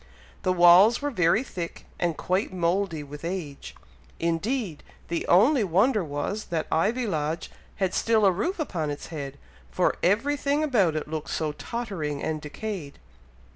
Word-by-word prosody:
The 185 - +1
walls 185 +6 +7
were 290 0 -2
very 180 +1 +3
thick, 175 -9 -7
and 170 -3 0
quite 185 +4 0
mouldy 175 -2 0
with 145 +2 -10
age. 165 -5 -5 0.4
Indeed, 170 - -1 0.3
the 170 0 -2
only 230 - +5
wonder 200 +5 +2
was, 160 +8 -3
that 165 -3 -2
Ivy 220 +10 +1
Lodge 160 -4 -2 0.2
had 190 -2 -1
still 225 -2 +3
a 195 - +6
roof 220 - -2
upon 175 - -2
its 145 - -6
head, 140 -2 -5 0.3
for - - +1
every 230 +11 +2
thing 285 +2 0
about 205 - +2
it 155 - -3
looked 155 -1 -5
so 155 -1 -1
tottering 165 -7 -4
and 155 -1 -2
decayed. 155 0 -6
180 Hz, 155 wpm, -26 LUFS, 160-220 Hz, 0.4 s, walls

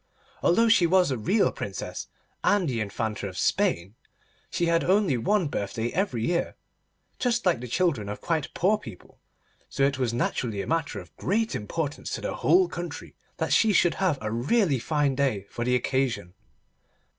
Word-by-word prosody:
Although 230 +7 +4
she 220 -6 +5
was 180 -3 +3
a - - +1
real 200 - +2
Princess - - -6 0.4
and 205 -4 +3
the 120 -4 -1
Infanta 105 0 -3
of 90 -1 -8
Spain, 85 +4 +1 0.6
she 175 - 0
had 165 0 +2
only 190 -5 +3
one 180 - +1
birthday 110 -2 -3
every 145 - -1
year, 170 0 -1 0.6
just 240 -2 0
like 175 -9 +3
the 125 - -6
children 130 - 0
of 105 - -5
quite 160 -4 -2
poor 210 +4 +2
people, 90 - -12 0.5
so 135 - -1
it 140 -1 +1
was 125 -3 +1
naturally 115 -3 -1
a - - -6
matter 160 -10 -1
of 90 -3 -14
great 220 +4 0
importance 145 +7 -3
to - - -6
the - - -3
whole 370 0 +4
country 175 - -7 0.2
that - - 0
she 220 -2 +4
should 175 -2 +4
have 180 -7 +2
a 105 0 -3
really 140 - +2
fine 145 +1 +1
day 130 -8 0
for 120 - -3
the 125 +1 +2
occasion. 125 -8 -1
145 Hz, 175 wpm, -26 LUFS, 115-185 Hz, 0.6 s, she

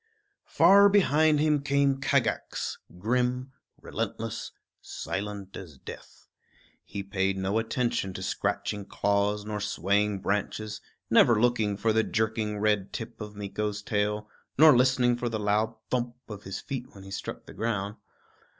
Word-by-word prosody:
Far 200 +1 +6
behind 155 -6 +4
him 150 -1 +2
came 140 -1 +2
Kagax, - - 0 0.2
grim, 125 +5 0 0.3
relentless, 115 0 -4 0.3
silent 100 -1 -5
as 80 -8 -9
death. - - -12 0.6
He 100 0 -6
paid 95 0 0
no 95 +3 0
attention 115 -3 -1
to 95 - -5
scratching 100 +1 -2
claws 100 +1 0
nor 105 0 -3
swaying 100 0 0
branches, 105 +1 -2 0.3
never 115 -3 +6
looking 110 -4 +2
for 110 +2 +1
the 110 - +4
jerking 110 -1 -1
red 105 -2 +1
tip 115 0 -7
of 105 -1 -7
Meeko's 105 +1 -3
tail, 105 0 -1 0.3
nor 155 0 +8
listening 125 -1 +3
for 120 0 -2
the 110 - -2
loud 105 +1 +1 0.2
thump 120 -1 -1
of 105 -2 -8
his 95 -1 -5
feet 130 -5 -6
when 100 - -11
he 95 - -11
struck 95 - -6
the - - -11
ground. 105 -2 -2
105 Hz, 140 wpm, -28 LUFS, 100-120 Hz, 0.6 s, nor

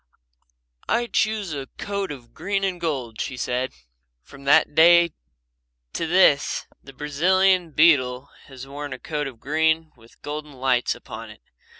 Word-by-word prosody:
"I 240 +1 +2
choose 215 -5 -1
a 135 -2 -5
coat 200 -3 -3
of 125 -5 -11
green 195 0 -2
and 185 -3 -2
gold," 130 -9 -3
she 130 - -4
said. 125 +1 -2 0.5
From 140 - -15
that 140 - +4
day 170 +1 +6 0.8
to 165 - -2
this 160 -5 +3 0.2
the 135 - -12
Brazilian 180 +6 +2
beetle 140 -4 +3
has 130 -1 -10
worn 145 0 -7
a - - -6
coat 150 -3 -3
of 125 -4 -10
green 160 +3 0
with 115 -1 -21
golden 150 0 -6
lights 130 -2 +1
upon - - -9
it. - - -14
150 Hz, 150 wpm, -23 LUFS, 135-170 Hz, 0.8 s, day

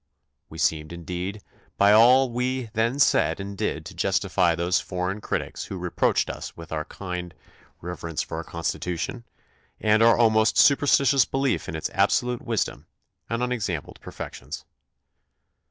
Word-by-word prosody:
We 80 - -10
seemed, 80 -1 0
indeed, 90 +4 -5 0.3
by 100 +1 +5
all 125 +4 +6
we 125 -1 -2
then 115 +4 +1
said 145 - +3
and 100 +1 -6
did - - -3
to - - -8
justify 85 -2 +1
those 85 +2 +1
foreign 90 +2 -3
critics - - -3
who 95 - -6
reproached 90 -1 +1
us - - -7
with 85 -1 -11
our 80 -1 -2
blind 90 0 -6 0.5
reverence 85 -2 -4
for - - -6
our - - -4
Constitution 85 +7 -4 0.5
and 110 +1 +3
our 115 0 +6
almost 110 -1 +3
superstitious 140 -2 +5
belief 135 - -1
in - - -4
its - - -3
absolute 125 -1 +1
wisdom 115 -3 -2 0.4
and 115 +1 -1
unex 125 -5 -1
ampled - - -15
perfections. 65 +5 -8
100 Hz, 145 wpm, -25 LUFS, 85-120 Hz, 0.5 s, all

